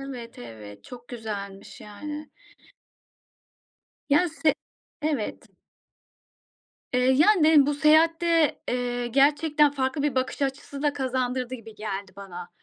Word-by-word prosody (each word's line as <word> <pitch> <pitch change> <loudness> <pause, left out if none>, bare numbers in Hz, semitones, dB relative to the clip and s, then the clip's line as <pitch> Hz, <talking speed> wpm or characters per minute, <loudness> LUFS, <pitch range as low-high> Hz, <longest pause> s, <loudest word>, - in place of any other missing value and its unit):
evet, 250 -4 -8
evet. 105 -4 -11
Çok 245 -1 -12
güzelmiş 205 -4 -7
yani. 295 +9 -8 1.8
Ya, 325 +5 +4
se 315 -1 +1 0.5
evet. 295 -8 -3 1.4
Eee, 250 - +2
yani, 320 +6 +5
dedim 305 -3 +6
bu 295 - +1
seyahatte, 325 +1 +3
eee, 245 -1 -1
gerçekten 295 +3 +3
farklı 270 0 -2
bir 290 -3 0
bakış 260 +2 -1
açısı 275 +1 -4
da 295 -1 +2
kazandırdı 255 -2 -2
gibi 225 -3 -11
geldi 200 -2 -5
bana. 180 -3 -9
265 Hz, 115 wpm, -26 LUFS, 225-295 Hz, 1.8 s, dedim